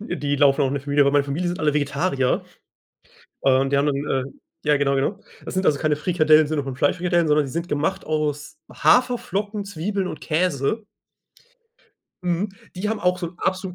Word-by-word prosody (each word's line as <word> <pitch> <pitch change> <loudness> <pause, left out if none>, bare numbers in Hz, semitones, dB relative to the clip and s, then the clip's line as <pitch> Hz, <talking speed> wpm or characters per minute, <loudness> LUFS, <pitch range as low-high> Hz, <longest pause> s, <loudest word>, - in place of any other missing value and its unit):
die 145 - -2
laufen 140 0 +4
auch 135 - +2
in 140 - -2
der 140 - -3
Familie, 145 0 +3
aber 140 - +3
in 140 - 0
meiner 145 -1 +4
Familie 160 +6 -2
sind 175 - -3
alle 150 -1 +2
Vegetarier, 140 -1 0 1.0
äh, 135 - +3
und 135 +1 0
die 140 - +3
anderen 140 0 0
äh, 130 -1 0 0.4
ja, 150 -1 +4
genau, 140 -1 +1
genau. 185 +9 -1 0.2
Das - - -7
sind 185 +1 0
also 145 - +3
keine 150 0 +1
Frikadellen 155 -1 +4
im 150 - 0
Sinne 150 -2 -1
von 135 -1 -5
Fleischfrikadellen, 170 +4 +1
sondern 150 -1 +3
die 130 - -8
sind 170 +2 -3
gemacht 145 0 -1
aus 155 -1 -2
Haferflocken, 210 -4 +1
Zwiebeln 195 +1 -3
und - - -7
Käse. 170 - 0 1.4
Mhm. 180 +3 0 0.3
Die 190 +3 -3
haben 220 -1 -2
auch 180 0 +1
so 175 - -3
'n 175 - -16
abso 190 -1 -2
155 Hz, 200 wpm, -23 LUFS, 140-180 Hz, 1.4 s, laufen